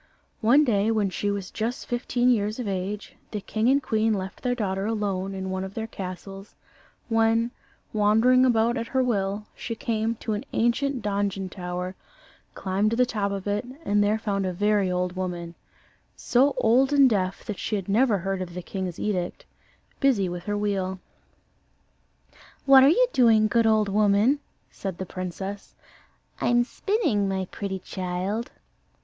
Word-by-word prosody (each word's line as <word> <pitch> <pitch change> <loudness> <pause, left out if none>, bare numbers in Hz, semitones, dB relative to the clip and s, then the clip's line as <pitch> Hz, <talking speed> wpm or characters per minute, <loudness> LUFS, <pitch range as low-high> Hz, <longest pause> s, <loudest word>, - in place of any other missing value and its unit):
One 250 +7 +5
day, 215 -5 +2
when 215 -4 +1
she 205 +3 -2
was 200 -2 -3
just 230 +3 -3
fifteen 245 0 +1
years 215 -2 0
of 245 -4 -4
age, 195 +2 -4
the 210 - -4
king 215 +3 0
and 280 +1 +3
queen 220 -2 +1
left 190 -1 -6
their 250 -1 0
daughter 195 -3 -2
alone 195 -3 -2
in 190 0 -4
one 190 0 -2
of 190 +1 -7
their 225 - -3
castles, 195 -1 -8 0.5
when, 225 +1 +2 0.4
wandering 225 +5 +4
about 235 -1 +3
at 230 0 -3
her 260 +1 +1
will, 205 -3 -1
she 230 - -5
came 225 -2 -1
to 220 0 -4
an 210 - -3
ancient 245 +2 +1
donjon 200 -2 -1
tower, 180 0 -5 0.6
climbed 195 +2 0
to 230 - -1
the 250 - +5
top 210 -5 -2
of 195 -1 -4
it, 205 +2 -1 0.2
and 205 0 +3
there 210 +2 +2
found 205 -3 -1
a 185 - -2
very 205 0 +2
old 180 0 -1
woman 175 -2 -4 0.6
so 265 +3 +2
old 255 +5 +3
and 280 -2 +6
deaf 195 -5 -1
that 210 - -5
she 215 - -2
had 195 -3 -4
never 220 +2 +3
heard 195 +1 -3
of 175 -1 -6
the 180 - -5
king's 185 -2 -4
edict 185 -4 -2 0.5
busy 240 -9 +3
with 175 0 -6
her 205 0 -1
wheel. 195 -2 -1 1.7
"What 270 -1 +8
are 275 - +7
you - - +4
doing, 225 -4 +5
good 230 +1 +2
old 215 -1 +3
woman?" 210 +6 +3 0.3
said 190 -3 -5
the 190 - -4
princess. 190 +3 -6 0.6
"I'm 240 0 +3
spinning, 260 - 0
my 190 -1 -1
pretty 195 -1 -4
child." 185 +4 -3
205 Hz, 165 wpm, -25 LUFS, 190-230 Hz, 1.7 s, What